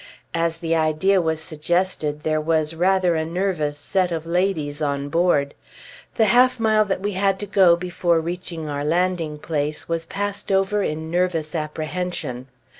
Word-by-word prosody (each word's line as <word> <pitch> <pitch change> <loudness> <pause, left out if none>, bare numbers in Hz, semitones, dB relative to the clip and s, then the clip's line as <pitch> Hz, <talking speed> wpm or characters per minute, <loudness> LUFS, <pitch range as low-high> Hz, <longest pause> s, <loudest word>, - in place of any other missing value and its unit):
As 165 0 0
the 165 -1 -1
idea 160 +5 +2
was 160 -1 -1
suggested, 160 -1 -1
there 155 -1 +1
was 155 0 0
rather 180 +1 +2
a 160 -1 0
nervous 165 -3 -1
set 180 +4 0
of 165 -1 -3
ladies 165 -4 -1
on 140 -1 -1
board. 155 -4 +2 0.6
The 220 - +4
half 250 +3 +4
mile 215 -1 +4
that 190 -2 -2
we 205 +1 -1
had 195 0 +1
to - - -1
go 190 -3 +5
before 175 -1 0
reaching 170 -1 -5
our 145 -1 -3
landing 165 -1 0
place 150 -1 -3
was 165 0 -2
passed 200 +1 -3
over 195 +2 +2
in 160 -2 -3
nervous 170 -3 0
apprehension. 155 -4 -3
165 Hz, 160 wpm, -22 LUFS, 155-185 Hz, 0.6 s, go